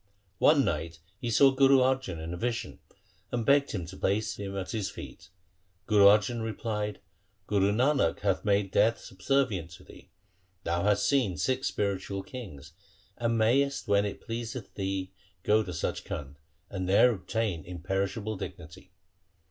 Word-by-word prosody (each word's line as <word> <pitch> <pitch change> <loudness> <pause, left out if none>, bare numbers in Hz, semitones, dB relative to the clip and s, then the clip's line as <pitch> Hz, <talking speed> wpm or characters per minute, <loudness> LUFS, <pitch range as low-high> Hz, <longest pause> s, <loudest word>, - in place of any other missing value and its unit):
One 145 -2 +5
night 80 0 -2 0.2
he 120 - -3
saw 135 +4 +6
Guru 135 0 +5
Arjan 130 -8 +1
in 80 +2 -5
a - - -3
vision, 120 +3 -3 0.5
and 120 -2 -2
begged 140 0 +4
him 90 -5 -3
to 90 +3 -10
place 105 +3 -1
him 100 -1 -5
at 95 -1 -4
his 105 -4 -2
feet. - - -10 0.6
Guru 105 -1 +5
Arjan 105 +3 +5
replied, 105 -2 -3 0.2
' 100 +2 -43
Guru 100 0 +2
Nanak 125 - +2
hath 100 -2 0
made 100 -2 +1
death 110 +4 +3
subservient 95 - -1
to - - -13
thee. - - -16 0.5
Thou 85 +1 -1
hast 105 -1 +2
seen 125 - +1
six 130 - 0
spiritual 100 -1 -2
kings, 90 - -9 0.4
and 115 -1 0
mayest 135 +5 +2
when 100 0 +3
it 105 - -5
pleaseth 115 -1 -5
thee 95 -1 -3 0.3
go 110 +2 +4
to 95 - -5
Sach 85 -1 -3
Khand, 70 0 -7 0.3
and 95 0 -4
there 125 +6 +6
obtain 95 -2 -2
imperishable 95 +4 -3
dignity.' 85 +1 -9
105 Hz, 155 wpm, -29 LUFS, 95-120 Hz, 0.6 s, saw